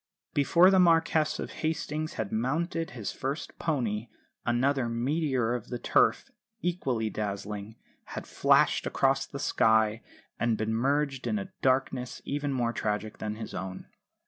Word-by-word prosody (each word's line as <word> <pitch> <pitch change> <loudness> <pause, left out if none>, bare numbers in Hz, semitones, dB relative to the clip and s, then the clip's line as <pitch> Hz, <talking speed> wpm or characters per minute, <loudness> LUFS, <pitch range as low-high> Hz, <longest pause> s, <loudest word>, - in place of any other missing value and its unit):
Before 170 +6 +5
the 190 - +5
Marquess 165 -3 +3
of - - -5
Hastings 155 -1 -2
had 110 -3 -3
mounted 165 +8 -1
his 115 -5 -5
first 140 +4 -5
pony 120 -8 -1 0.4
another 125 +1 +2
meteor 130 0 0
of 120 -3 -4
the 120 - -4
Turf, - - +2 0.3
equally 130 - -1
dazzling, 105 +1 -4 0.3
had - - -7
flashed - - +3
across - - +2
the - - -7
sky, 110 0 +3 0.4
and 115 -2 +1
been 110 +1 -1
merged 135 +3 0
in 215 - 0
a 190 -2 -5
darkness 130 -1 0
even 145 0 -2
more 120 -3 0
tragic 105 -1 -2
than 105 0 -3
his 110 0 -7
own. 95 -1 -6
125 Hz, 145 wpm, -29 LUFS, 110-150 Hz, 0.4 s, Before